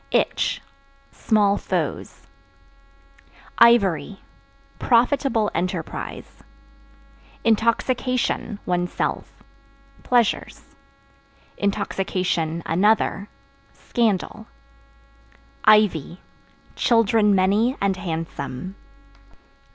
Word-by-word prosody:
Itch - - 0 0.5
Small 205 -2 +2
foes. - - -4 1.3
Ivory 195 -6 +4 0.6
Profitable 240 -2 +2
enterprise. 180 -2 -5 1.0
Intoxication 230 0 0
(One's 175 0 -1
self) - - -4 0.6
pleasures; 240 -3 -1 0.9
(another) 195 0 0 0.4
scandal. 220 -1 -2 1.2
Ivy 200 -6 +3 0.6
Children 225 -3 +3
many 205 +7 +2
and 195 -1 0
handsome. 165 -2 -5
205 Hz, 50 wpm, -22 LUFS, 180-230 Hz, 1.3 s, Ivory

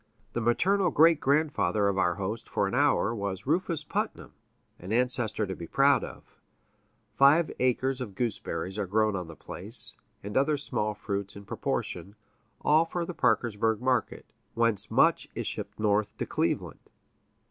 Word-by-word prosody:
The 120 - -2
maternal 180 - +2
great 160 +1 +5
grandfather 140 -7 +1
of 100 - +1
our 90 -2 +2
host 105 +5 -5
for 100 - 0
an 95 - -5
hour 135 -4 +2
was 100 -3 -4
Rufus 165 +1 0
Putnam, - - -4 0.5
an 90 +3 -8
ancestor 120 -2 +1
to 95 -1 -5
be 85 - -8
proud 140 - +3
of. - - -11 0.7
Five 145 +7 +5
acres 130 +1 +1
of 105 -6 -6
gooseberries 105 -4 -3
are 100 - -2
grown 110 +1 +1
on 90 -3 -4
the 85 - -10
place, - - 0 0.3
and 105 +1 -6
other 145 +2 +2
small 105 -6 -2
fruits 100 -1 -4
in 100 0 -10
proportion 100 0 -4 0.5
all 155 +2 +4
for 170 +1 -3
the 180 - -6
Parkersburg 110 -4 +1
market, 125 -1 -1 0.3
whence 115 -3 +1
much - - +3
is - - -3
shipped - - -5
north 105 -1 0
to - - -2
Cleveland. - - -2
115 Hz, 160 wpm, -28 LUFS, 100-140 Hz, 0.7 s, great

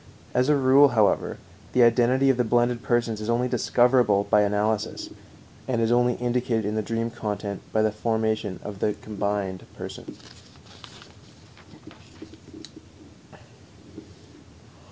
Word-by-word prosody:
As 125 +3 +1
a 150 - +4
rule, 135 +1 +5
however, 105 -2 +2 0.4
the 125 - +5
identity 125 +3 +3
of 130 - -3
the 125 - +2
blended 120 +1 +1
persons 120 -3 -1
is 105 - -5
only 120 +2 +1
discoverable 120 -3 +2
by 105 0 +3
analysis, 105 +1 -1 0.6
and 125 -3 -1
is 115 0 +1
only 120 0 +2
indicated 120 -2 -1
in 105 - -2
the 110 - -1
dream 115 +2 -3
content 105 -3 -5
by 110 - +1
the 110 - +1
formation 110 -2 -2
of 100 -2 -8
the 105 - 0
"combined" 100 -3 -4
person. - - -9
115 Hz, 120 wpm, -24 LUFS, 105-125 Hz, 0.6 s, rule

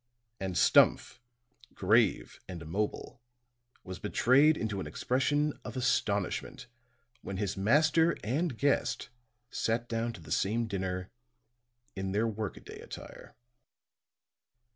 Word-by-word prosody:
And 95 -2 -3
Stumph, - - +4 0.6
grave 105 +2 +2
and 85 -3 -7
immobile, 105 +8 -3 0.6
was 95 -1 -7
betrayed 135 +9 +4
into 105 -3 -3
an - - -4
expression 145 +4 0
of - - -7
astonishment 125 - -1 0.6
when 95 - -5
his 100 -1 -2
master 155 +11 +3
and 140 +3 -1
guest 140 +3 0 0.4
sat 115 +2 -1
down 115 0 -1
to - - -11
the 80 - -12
same 115 +4 +1
dinner 95 -3 -4 0.8
in 95 -1 -3
their 110 +3 +1
work 110 -2 -4
a - - -11
day - - -11
attire. - - -11
110 Hz, 120 wpm, -30 LUFS, 95-130 Hz, 0.8 s, Stumph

